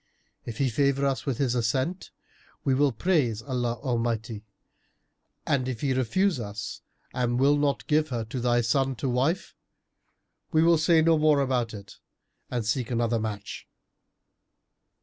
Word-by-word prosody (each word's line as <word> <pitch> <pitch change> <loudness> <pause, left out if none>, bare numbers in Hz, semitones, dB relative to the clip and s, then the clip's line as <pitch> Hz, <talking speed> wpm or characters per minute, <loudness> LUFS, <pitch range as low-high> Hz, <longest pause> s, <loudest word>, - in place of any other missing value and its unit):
If 115 -2 -5
he 135 -2 +1
favour 140 +2 +1
us 135 +1 -1
with 130 -4 -1
his 130 -4 +1
assent, 130 +9 -1 0.5
we 135 - +2
will 140 +1 +3
praise 125 - 0
Allah 125 -3 -1
Almighty; 115 -4 -2 1.0
and 130 -3 0
if 120 -4 -5
he 135 -2 +1
refuse 170 - +1
us 105 -1 -6 0.3
and 125 -1 0
will 140 +2 +4
not 145 -1 0
give 155 0 +1
her 120 -3 -3
to 125 +3 -5
thy 120 0 +2
son 135 +3 +1
to 135 - -3
wife, 130 +8 0 1.0
we 160 -1 +4
will 165 -1 +4
say 160 0 +4
no 165 -1 +4
more 150 -2 +4
about 125 -4 0
it 100 -1 -12 0.5
and 120 -3 -2
seek 115 +2 -1
another 115 -1 0
match." 105 -2 -6
130 Hz, 150 wpm, -26 LUFS, 115-145 Hz, 1.0 s, will